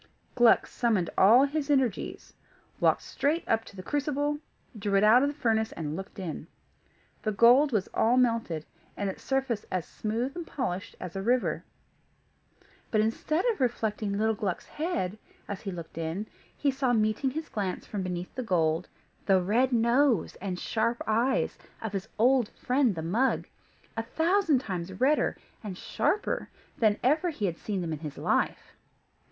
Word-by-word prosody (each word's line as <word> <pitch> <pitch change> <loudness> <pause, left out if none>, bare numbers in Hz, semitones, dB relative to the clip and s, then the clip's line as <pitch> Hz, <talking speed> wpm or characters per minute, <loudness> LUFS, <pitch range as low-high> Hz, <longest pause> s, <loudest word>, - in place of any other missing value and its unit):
Gluck 240 -2 +5
summoned 215 -8 0
all 230 +7 +7
his 290 0 -2
energies, 265 -8 0 0.5
walked - - +3
straight 310 +4 0
up 225 0 +2
to - - -13
the 185 - -8
crucible, 290 +1 -1 0.4
drew 200 -1 0
it 195 - +4
out 225 +4 +7
of 280 - +3
the 290 - -6
furnace, 220 -3 +1
and 155 -2 -4
looked 195 +3 -8
in. 165 -5 -5 0.7
The 215 - -1
gold 245 +7 +6
was 210 -5 0
all 235 +3 +3
melted, 230 -11 +1 0.3
and 200 -1 -1
its - - -13
surface 265 -5 -1
as 185 -3 -2
smooth 230 +5 -3
and 345 -2 -6
polished 200 -9 -3
as 180 -1 -7
a 195 - -2
river; 245 +5 +1 1.3
but 215 - +1
instead 270 - 0
of 425 - -6
reflecting 215 -4 0
little 220 +1 +2
Gluck's 205 -5 -3
head, 220 - -3 0.3
as 200 - -5
he 195 - -4
looked 170 -2 -8
in, 165 +6 -3 0.3
he 285 - +2
saw 265 -2 +1
meeting 215 +4 +1
his 315 +4 -5
glance 195 -4 -3
from 205 - -4
beneath 180 -1 -4
the 255 - -3
gold 170 -6 +1 0.4
the 190 -2 +5
red 230 +8 +2
nose 235 - +3
and 185 -2 -3
sharp 230 +4 -1
eyes 235 +5 +1 0.2
of 220 -2 -5
his 195 -1 -3
old 245 0 +4
friend 260 0 +2
of 200 - -2
the 160 - -3
mug, 225 +11 +1 0.5
a 225 - 0
thousand 320 - +2
times 185 -4 -5
redder 290 +4 +2 0.3
and 195 -4 -6
sharper 420 - -1 0.3
than 215 -3 +3
ever 305 +7 +3
he 265 -10 -3
had 170 -3 -2
seen 200 -3 -3
them 165 -2 -3
in 155 - -5
his 150 -2 -7
life. - - 0
220 Hz, 170 wpm, -28 LUFS, 190-265 Hz, 1.3 s, all